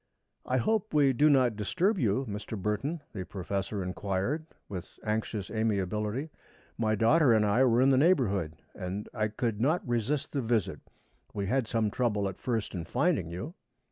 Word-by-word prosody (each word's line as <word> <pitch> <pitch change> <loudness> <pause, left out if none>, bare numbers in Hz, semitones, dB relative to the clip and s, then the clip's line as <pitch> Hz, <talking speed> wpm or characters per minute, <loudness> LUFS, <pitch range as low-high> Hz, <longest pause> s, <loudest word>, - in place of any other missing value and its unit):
"I 130 - +1
hope 215 - 0
we 140 -3 +5
do 150 +5 +4
not 130 -5 +4
disturb 185 - 0
you, 120 +2 +1
Mr. 105 0 -5
Burton?" 105 - -2
the 95 -4 -4
professor 100 +1 -3
inquired, 100 - -2 0.2
with 90 -4 -8
anxious 105 -1 -2
amiability. 105 - -1 0.4
"My 110 -1 +1
daughter 125 +5 +4
and 110 -1 +4
I 105 +5 +3
were 120 0 +4
in 135 - +5
the 130 - +4
neighborhood 100 - +2 0.2
and 95 +3 -5
I 110 0 0
could 110 0 -2
not 155 +4 +1
resist 120 +4 -1
the 140 - -1
visit. 115 -4 0 0.6
We 100 - -1
had 125 +3 0
some 110 -2 0
trouble 105 -5 0
at 95 - -6
first 115 -4 -2
in 90 -3 -3
finding 125 - 0
you." 90 - -6
110 Hz, 170 wpm, -29 LUFS, 100-135 Hz, 0.6 s, we